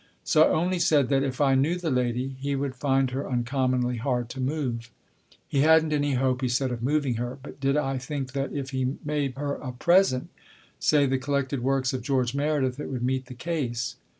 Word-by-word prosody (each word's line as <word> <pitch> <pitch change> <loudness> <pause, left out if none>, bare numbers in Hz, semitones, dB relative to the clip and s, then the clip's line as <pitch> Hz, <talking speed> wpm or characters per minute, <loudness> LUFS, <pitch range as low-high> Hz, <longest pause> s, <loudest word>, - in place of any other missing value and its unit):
So 155 - +3
I - - +2
only 175 +3 +1
said 150 -5 +3
that, 135 -1 +3
if 135 -2 -2
I 140 -2 +4
knew 140 +6 +2
the 175 -3 -2
lady, 125 +1 -1
he 140 +1 -1
would 135 -1 -2
find 135 0 +1
her 135 +2 -3
uncommonly 125 0 0
hard 120 0 -1
to 130 - -7
move. 130 -4 -2 0.6
He 140 - 0
hadn't 160 0 +5
any 145 -1 +1
hope, 130 0 +1
he 130 - +1
said, 130 +2 0
of 120 -2 -4
moving 135 -2 +1
her; 120 +2 -4
but 145 - -10
did 135 +1 +1
I 135 -2 0
think 135 0 -4
that 135 0 -2
if 140 -1 -4
he 130 +1 -1
made 145 -3 -1
her 145 0 -2
a 130 - -6
present 170 -1 +3 0.5
say, 145 -2 +3
the 135 -1 +1
Collected 140 -1 -1
Works 130 0 +1
of 130 - -2
George 130 -4 0
Meredith, 140 -2 0
it - - -5
would 125 -2 -3
meet 130 0 -1
the 125 - -9
case 120 -7 -3
135 Hz, 210 wpm, -26 LUFS, 125-145 Hz, 0.6 s, hadn't